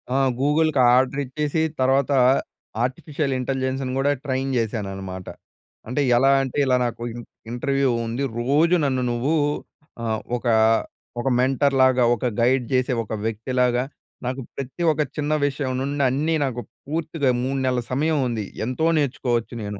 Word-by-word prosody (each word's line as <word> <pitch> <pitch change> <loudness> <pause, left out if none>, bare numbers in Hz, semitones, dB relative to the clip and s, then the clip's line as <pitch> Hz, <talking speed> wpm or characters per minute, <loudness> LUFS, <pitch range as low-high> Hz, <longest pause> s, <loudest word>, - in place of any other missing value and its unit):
ఆ! - - +3 0.2
గూగుల్‌కి 150 +1 +2 0.2
ఆర్డరిచ్చేసి 140 +4 0 0.2
తర్వాత, 135 +2 +2 0.7
artificial 140 +2 -2
intelligence 130 +1 -2 0.2
కూడా 140 +1 +2
ట్రైన్ 135 0 -1
చేశానన్నమాట. 95 -5 -4 0.6
అంటే, 130 +5 -1 0.2
ఎలా 135 +3 +4
అంటే 130 +1 -5
ఇలా 130 -1 +3
నాకు 120 0 -4
ఇం 120 - -7 0.3
ఇంటర్వ్యూ 135 +2 0 0.2
ఉంది. 120 +5 -3 0.2
రోజు 150 +8 +3
నన్ను 130 -2 0
నువ్వు 130 +7 0 0.7
ఆహ్, 110 -1 -1 0.2
ఒకా 120 -1 +1 0.6
ఒక 135 - 0
మెంటర్ 135 +2 +2
లాగా, 130 -1 +4
ఒక 120 - -5
గైడ్ 125 +2 +3
చేసే 130 0 +2
ఒక 110 - -7
వ్యక్తిలాగా, 125 +3 0 0.4
నాకు 130 +2 -2
ప్రతి 140 +6 -5
ఒక 155 - 0
చిన్న 150 +1 -1
విషయం 135 -2 -2
నుండి 140 +2 -2
అన్నీ 150 +5 0
నాకు 125 -3 -2 0.3
పూర్తిగా 155 -2 -1
3 135 +2 -1
నెలల 125 -1 +1
సమయం 155 +4 +1
ఉంది, 110 -4 -3 0.2
ఎంతో 130 +7 -1
నేర్చుకోవచ్చు 125 -5 -1
నేను. 105 -1 -5
130 Hz, 140 wpm, -23 LUFS, 120-140 Hz, 0.7 s, ఎలా